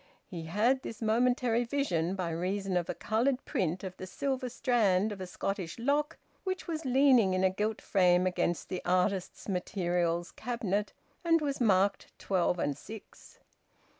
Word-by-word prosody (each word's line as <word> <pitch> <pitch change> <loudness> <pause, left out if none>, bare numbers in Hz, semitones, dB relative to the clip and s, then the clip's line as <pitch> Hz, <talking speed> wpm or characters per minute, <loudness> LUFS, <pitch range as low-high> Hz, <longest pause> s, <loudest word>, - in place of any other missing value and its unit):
He 170 -3 -7
had 230 +10 +2
this 225 - -7
momentary 240 +1 +2
vision 195 - -1
by 180 -3 -2
reason 185 +3 -2
of 175 -1 0
a - - -2
coloured 250 +5 0
print 180 +1 -1
of 185 -1 -6
the 185 - -7
"Silver 260 +4 -2
Strand" 215 -6 +2
of 200 -2 -7
a 185 - -5
Scottish 180 -1 -4
loch 290 +6 0 0.3
which 375 -1 -3
was 320 -2 -4
leaning 255 -7 +4
in 185 - +1
a 190 - +4
gilt 210 +3 -2
frame 180 -2 +3
against 175 -2 -1
the 185 - -3
artists' 185 +1 0
materials 175 -2 -1
cabinet 210 -4 -2 0.3
and 330 -1 +4
was 280 -4 -2
marked 200 -2 +2
twelve 180 -2 0
and 145 -4 -1
six. 220 +4 -12
200 Hz, 160 wpm, -30 LUFS, 180-245 Hz, 0.3 s, leaning